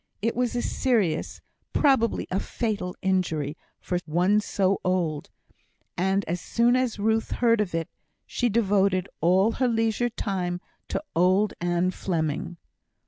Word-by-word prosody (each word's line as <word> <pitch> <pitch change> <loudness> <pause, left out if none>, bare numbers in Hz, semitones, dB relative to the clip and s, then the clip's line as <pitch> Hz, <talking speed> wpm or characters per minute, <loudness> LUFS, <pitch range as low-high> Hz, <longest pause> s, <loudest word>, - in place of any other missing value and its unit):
It 225 +3 -1
was 245 -1 0
a 240 - 0
serious 210 -12 0 0.3
probably 265 -6 +2
a 190 - +1
fatal 205 -6 -3
injury, 165 -6 0 0.2
for 180 - -2
one 180 +6 +3
so 195 -2 0
old; 175 -5 -1 0.7
and 190 +2 +1
as 170 +1 -3
soon 235 +1 +2
as 255 -3 0
Ruth 220 +2 +1
heard 230 -2 +3
of 180 -5 -2
it 165 -1 -1 0.4
she 245 - 0
devoted 195 -4 +2
all 185 +6 +4
her 255 +2 0
leisure 225 0 +1
time 185 -5 -2 0.3
to - - -3
old 185 +4 +3
Ann 175 +1 +1
Fleming. 165 -2 -2
195 Hz, 140 wpm, -26 LUFS, 175-225 Hz, 0.7 s, all